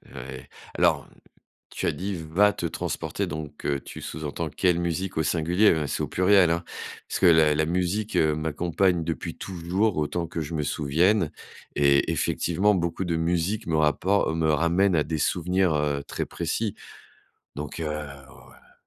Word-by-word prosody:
Oui. 65 +1 -7 0.3
Alors, - - +2 0.6
tu - - -4
as - - +3
dit: 100 +2 -4
«va 90 +6 +2
te - - -4
transporter» - - -3
donc, 75 -1 -7
heu, 70 -1 0
tu - - -9
sous-entends 80 +1 -4
quelle 90 +2 +1
musique 85 +2 -2
au 80 - +2
singulier? 85 +7 +3
Ben, 75 -3 0
c'est - - -2
au - - -1
pluriel 95 -1 +4
hein, 85 +1 0 0.5
parce - - -2
que - - +3
la 80 -3 +6
la 80 - +2
musique, 90 +5 -1
heu, 80 -1 +3
m'accompagne 85 +3 0
depuis 85 +1 -4
toujours 95 +3 -1
autant 80 +3 -1
que 85 - -5
je 75 +2 -5
me 75 - -1
souvienne 80 +6 +2 0.4
et 70 -1 +3
effectivement, 105 +2 +1
beaucoup 85 +1 -1
de 85 -1 -1
musiques 85 +6 0
me 80 -2 +1
rappor 80 +4 +2
me 80 -1 +2
ramènent 85 +5 +2
à 75 - +3
des 80 +1 -3
souvenirs, 90 +2 +1
heu, 75 -1 0
très - - -4
précis, 95 +5 -2 0.8
donc 75 +2 -6
heu, 80 - -2 0.4
oh, - - -17
heu - - -22
85 Hz, 170 wpm, -26 LUFS, 75-90 Hz, 0.8 s, la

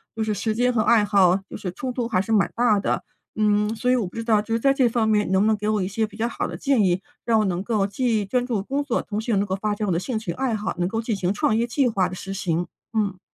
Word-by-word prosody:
就 225 - -1
是 215 -1 -1
时 215 +2 -2
间 250 +2 +2
和 220 - +2
爱 225 -1 +4
好， 195 -3 +4
就 - - -7
是 200 -3 -5
冲 250 +6 -4
突 245 -2 -2
还 190 -5 +1
是 225 - -5
蛮 210 -3 +3
大 230 -3 +3
的。 - - -1 0.3
嗯， 210 0 +2
所 250 +2 -1
以 255 - +5
我 235 -5 0
不 180 - -13
知 230 - -3
道 220 -2 +3
就 225 +2 -4
是 230 - +1
在 275 +3 +3
这 260 -3 +3
方 225 -1 +1
面 210 -3 +2
能 190 - +3
不 210 - +3
能 220 - +3
给 210 0 -4
我 210 -3 +1
一 185 - -2
些 220 +3 -1
比 210 - -14
较 230 +1 0
好 235 - -3
的 - - -6
建 270 -6 +2
议， 180 -1 +1 0.2
让 225 -1 +3
我 215 - +2
能 185 -1 -1
够 210 -3 +1
既 220 0 0
专 245 +5 0
注 225 -6 -2
工 275 +6 -2
作， 285 - -1
同 210 0 -4
时 235 +1 -3
又 200 - +2
能 200 - +1
够 190 -1 -2
发 210 +1 -2
展 210 0 -3
我 180 - +1
的 165 - +1
兴 235 +4 -3
趣 195 -6 -4
爱 240 +5 -1
好， 215 +1 -3
能 175 +1 0
够 225 +2 -2
进 225 -2 -2
行 185 -1 -1
创 210 +1 +1
业 230 +1 +2
计 255 +2 +1
划 190 -5 +1
的 185 - -7
实 195 +1 -6
行， 175 -2 -1 0.3
嗯。 200 -4 -1
215 Hz, 340 characters per minute, -23 LUFS, 195-230 Hz, 0.3 s, 以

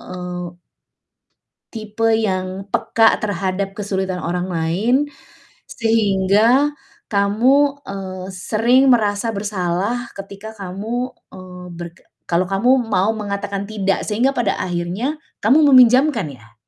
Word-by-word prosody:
eee 180 0 -7 1.4
tipe 220 0 -2
yang 190 -2 -2
peka 225 -1 +3
terhadap 195 -1 -2
kesulitan 190 -3 -2
orang 180 +2 -2
lain 175 +8 0 0.8
sehingga 225 +5 +2 0.4
kamu, 260 +8 +2
eee, 190 -1 -6
sering 235 +8 +2
merasa 210 -1 +1
bersalah 200 +3 -2
ketika 200 +2 -9
kamu, 215 +6 -4 0.2
eee, 180 -1 -10
berke 170 0 -9 0.3
kalau 175 +1 +2
kamu 235 +8 +3
mau 200 -1 +1
mengatakan 200 -1 -4
"tidak" 195 -2 -1
sehingga 230 +5 +1
pada 220 -5 +1
akhirnya 185 - -2 0.2
kamu 290 +8 +5
meminjamkan 255 - +5
ya? 110 0 -20
200 Hz, 105 wpm, -19 LUFS, 185-230 Hz, 1.4 s, kamu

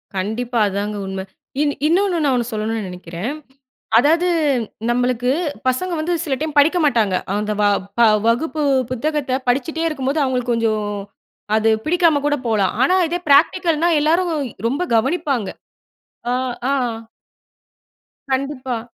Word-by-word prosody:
கண்டிப்பா. 230 +5 -2
அதாங்க 205 +1 -3
உண்ம. 190 0 -4 0.4
இன் 290 -1 +1
இன்னொன்னு 365 +1 +2
நான் 275 -2 +2
ஒண்ணு 240 0 -1
சொல்லணுனு 215 -1 -2
நினைக்கிறேன். 180 - -5 0.6
அதாவது 325 +7 +4 0.6
நம்மளுக்கு 245 0 +1 0.4
பசங்க 345 +8 0
வந்து 340 +3 -1
சில 285 -5 -2
டைம் 305 -1 -3
படிக்க 320 +5 +4
மாட்டாங்க. 220 -8 +2 0.2
அந்த 210 0 -1
வ - - +3 0.4
ப - - +5 0.3
வகுப்பு 300 +6 0 0.3
புத்தகத்த 265 0 -1
படிச்சுட்டே 280 +6 0
இருக்கும்போது 285 0 -1
அவுங்களுக்கு 250 -2 0
கொஞ்சோம் 215 -3 -1 0.6
அது 220 0 +3 0.2
பிடிக்காம 330 -3 +3
கூட 290 0 +2
போலாம். 205 -5 +1
ஆனா 365 +7 +3
இதே 350 +2 -2
பிராக்டிகல்னா 330 +3 +4
எல்லாரும் 335 +3 +2 0.4
ரொம்ப 280 +9 -1
கவனிப்பாங்க. 270 - 0 0.8
ஆ, - - +1 0.4
ஆ. - - +2 1.6
கண்டிப்பா. 260 -3 -2
260 Hz, 125 wpm, -20 LUFS, 225-310 Hz, 1.6 s, ப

